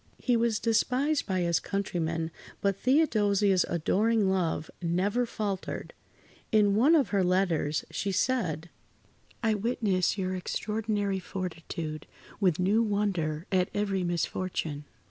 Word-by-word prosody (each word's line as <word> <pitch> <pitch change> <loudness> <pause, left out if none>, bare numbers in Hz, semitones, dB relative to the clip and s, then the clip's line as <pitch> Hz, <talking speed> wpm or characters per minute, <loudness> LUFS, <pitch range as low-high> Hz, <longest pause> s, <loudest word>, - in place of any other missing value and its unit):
He 245 - +1
was 230 -2 +2
despised 255 +7 +1
by 185 -2 0
his 170 -1 +2
countrymen, 165 -4 -2 0.3
but 200 -1 +1
Theodosia's 205 - +3
adoring 200 +5 +2
love 165 -4 -1
never 195 +8 0
faltered. 200 -4 -4 0.6
In 210 -2 +4
one 265 +11 +5
of 290 -5 +3
her 200 -2 +2
letters 175 -5 +1
she 200 - -2
said: 180 - 0 0.7
"I 220 -1 +3
witness 205 -4 0
your 185 -1 -1
extraordinary 205 +1 -2
fortitude 165 -4 -5 0.3
with 185 -6 +2
new 200 +5 +3
wonder 190 -7 -1
at 185 -1 +2
every 200 -2 0
misfortune. 170 -3 -2
195 Hz, 120 wpm, -29 LUFS, 175-215 Hz, 0.7 s, one